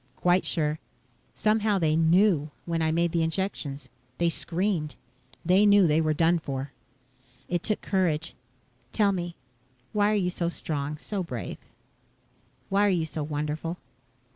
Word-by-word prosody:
"Quite 180 +1 +2
sure. 155 -2 0 0.6
Somehow 215 -1 +2
they 160 -4 +2
knew 165 -1 +3 0.2
when 165 -1 -1
I 160 0 +2
made 170 +1 +1
the 170 -1 +1
injections. 160 -4 -2 0.3
They 170 0 +2
screamed. 170 -2 -2 0.5
They 185 +4 +5
knew 205 -2 +6
they 155 0 +3
were 155 -1 +1
done 165 +2 +3
for." 135 -2 -5 0.8
"It 175 -1 -1
took 215 - -1
courage. 165 -5 0 0.6
Tell 205 -2 +3
me: 175 -2 -4 0.6
why 205 0 +3
are 215 - +2
you 180 -3 +1
so 170 -1 -1
strong, 150 -3 -3
so 200 +5 -4
brave? 125 - -5 1.1
Why 200 +1 +3
are - - +3
you 175 -4 +1
so 155 0 -5
wonderful?" 150 +3 -3
170 Hz, 145 wpm, -27 LUFS, 155-190 Hz, 1.1 s, knew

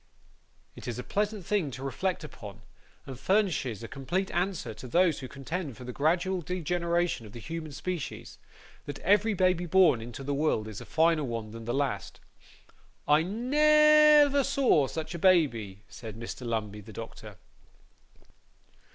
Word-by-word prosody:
It - - -10
is 120 - -3
a 125 - -5
pleasant 210 - -2
thing 195 -7 0
to 130 0 -8
reflect 180 +7 -2
upon, 105 -9 -10 0.4
and 130 -2 -8
furnishes 155 - 0
a - - -5
complete 155 +9 -3
answer 180 - -2
to 125 - -10
those 170 +3 +2
who 130 - -7
contend 140 +1 -5
for 125 - -10
the 125 0 -7
gradual 175 +6 +1
degeneration 175 -5 -1
of 105 - -14
the 120 - -8
human 155 +6 -6
species, 155 +2 -5 0.5
that 145 -1 -5
every 205 +3 +3
baby 180 -1 +2
born 165 -9 +4
into 120 +3 -8
the 140 +1 -2
world 140 -7 0
is 110 -2 -7
a - - -9
finer 160 -1 +2
one 115 -4 -4
than 115 0 -9
the 120 - -2
last. 135 -10 -2 0.9
'I 150 +1 +5
ne 300 - +5
ver 280 0 +1
saw 260 - +3
such 160 +4 -5
a 170 - -5
baby,' 120 - +2
said 110 -2 -9
Mr. 120 +1 -6
Lumbey, 105 -2 -3
the 110 +2 -12
doctor. 110 -2 -9
155 Hz, 160 wpm, -29 LUFS, 120-185 Hz, 0.9 s, I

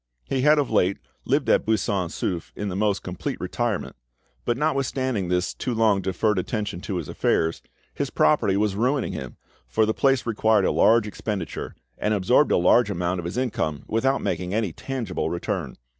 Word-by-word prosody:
He 130 - -1
had 150 +3 +5
of 145 -3 0
late 95 +2 +2 0.3
lived - - +1
at - - +4
Buisson 105 -4 0
Souef 85 -1 -3
in 105 - -3
the 90 - -4
most 100 0 0
complete 90 -1 -4
retirement; - - -2 0.5
but 120 - 0
notwithstanding 130 - 0
this 90 0 0
too 125 - -3
long 110 -3 +3
deferred 95 +2 0
attention 100 -2 -3
to 100 - -4
his 85 -4 -3
affairs, 80 0 0 0.3
his - - -2
property 95 +6 +3
was 105 -1 +1
ruining 125 +5 0
him, 65 -2 -7 0.3
for 110 - +2
the 110 - 0
place 135 0 +2
required 110 -3 +2
a - - +2
large 115 0 +4
expenditure, 105 -3 -5 0.2
and 105 0 +1
absorbed 125 +9 +3
a - - +4
large 105 +6 +4
amount 90 -1 -1
of 85 - -5
his 85 +7 -4
income 80 - -1
without 135 +5 +1
making 90 +2 -2
any 110 -7 0
tangible 120 -6 -3
return. 85 - -3
105 Hz, 180 wpm, -24 LUFS, 90-120 Hz, 0.5 s, had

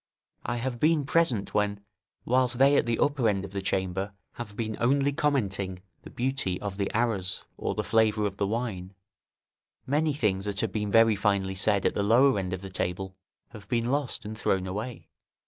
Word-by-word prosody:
I - - -2
have 120 0 -3
been 155 0 +3
present 135 -9 +1
when, 105 -1 0 0.4
whilst 125 0 +2
they 135 +2 +5
at 120 - +2
the 115 -1 +1
upper 140 -6 +2
end 100 -1 -1
of 95 - -10
the 100 0 -3
chamber 95 +1 -2 0.2
have 110 -4 -8
been 110 -1 -3
only 140 +3 +2
commenting 100 -11 -1 0.2
the - - -11
beauty 125 -8 -1
of 100 -2 -5
the 100 -1 -1
arras, 105 -5 -1
or - - -3
the - - -1
flavour 110 -1 +2
of 100 -1 -3
the 100 - 0
wine, 100 -4 -3 0.9
many 150 +2 +1
things 100 -7 0
that 100 -2 -1
have - - -1
been 105 -2 -2
very 115 0 +5
finely 100 -1 0
said 100 +1 +2
at - - +2
the - - -1
lower 120 +4 +4
end 90 -2 -3
of 95 -1 -4
the 95 - -7
table 95 +1 -3 0.3
have 105 -4 -13
been 120 0 0
lost 135 -5 -2
and 110 +1 -5
thrown 95 -4 0
away. 105 +6 -5
105 Hz, 195 wpm, -27 LUFS, 95-125 Hz, 0.9 s, they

